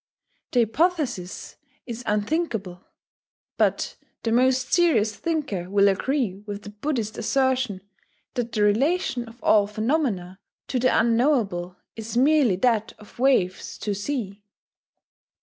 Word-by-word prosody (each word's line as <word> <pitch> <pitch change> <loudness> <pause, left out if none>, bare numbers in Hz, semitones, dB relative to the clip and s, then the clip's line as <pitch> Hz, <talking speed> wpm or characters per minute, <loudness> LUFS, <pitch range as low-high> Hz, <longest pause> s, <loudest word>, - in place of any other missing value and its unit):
The 245 - +4
hypothesis 250 - -1 0.3
is 240 -2 -6
"unthinkable." 210 - -1 0.7
But - - 0 0.3
the 225 - 0
most 255 +2 +2
serious 230 - +3
thinker 210 - -2
will 200 0 +4
agree 200 0 0
with 205 0 -6
the 205 - -9
Buddhist 220 -1 -3
assertion 260 -7 0 0.5
that 240 -2 -3
the 210 -3 +1
relation 255 - +1
of 230 +2 -16
all 205 -2 +4
phenomena 215 - -1 0.3
to 255 - 0
the 255 - +3
unknowable 230 -7 +1 0.2
is 225 +1 -5
merely 275 -5 +4
that 225 +1 +1
of 210 +2 -17
waves 245 -9 +1
to 205 - -2
sea. 205 -2 -4
230 Hz, 120 wpm, -24 LUFS, 205-265 Hz, 0.7 s, The